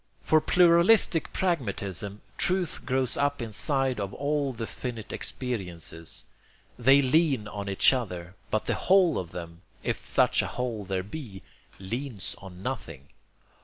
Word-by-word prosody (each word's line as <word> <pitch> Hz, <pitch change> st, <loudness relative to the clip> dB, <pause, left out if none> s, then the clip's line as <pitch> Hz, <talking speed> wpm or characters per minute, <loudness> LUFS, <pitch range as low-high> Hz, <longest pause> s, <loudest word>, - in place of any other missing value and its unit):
For 155 Hz, 0 st, +4 dB
pluralistic 175 Hz, +1 st, +4 dB
pragmatism, 105 Hz, -, -2 dB, 0.2 s
truth 185 Hz, -2 st, +1 dB
grows 130 Hz, -2 st, +1 dB
up 145 Hz, 0 st, +1 dB
inside 130 Hz, +3 st, 0 dB
of 100 Hz, -1 st, -4 dB
all 145 Hz, 0 st, 0 dB
the 115 Hz, -2 st, -5 dB
finite 115 Hz, -2 st, -6 dB
experiences. 90 Hz, -9 st, -4 dB, 0.5 s
They 135 Hz, +3 st, +5 dB
lean 135 Hz, -5 st, +2 dB
on 100 Hz, -1 st, -5 dB
each 100 Hz, +6 st, +6 dB
other, 90 Hz, -8 st, -4 dB, 0.2 s
but 110 Hz, -, 0 dB
the -, -, 0 dB
whole 185 Hz, -3 st, +4 dB
of 90 Hz, -, -6 dB
them, 85 Hz, -1 st, -8 dB, 0.2 s
if -, -, -2 dB
such -, -, +3 dB
a -, -, -3 dB
whole 120 Hz, -5 st, -3 dB
there 95 Hz, 0 st, -2 dB
be, 105 Hz, -3 st, -8 dB, 0.4 s
leans 115 Hz, 0 st, -4 dB
on 95 Hz, -1 st, -11 dB
nothing. 80 Hz, -, -5 dB
120 Hz, 135 wpm, -27 LUFS, 95-145 Hz, 0.5 s, each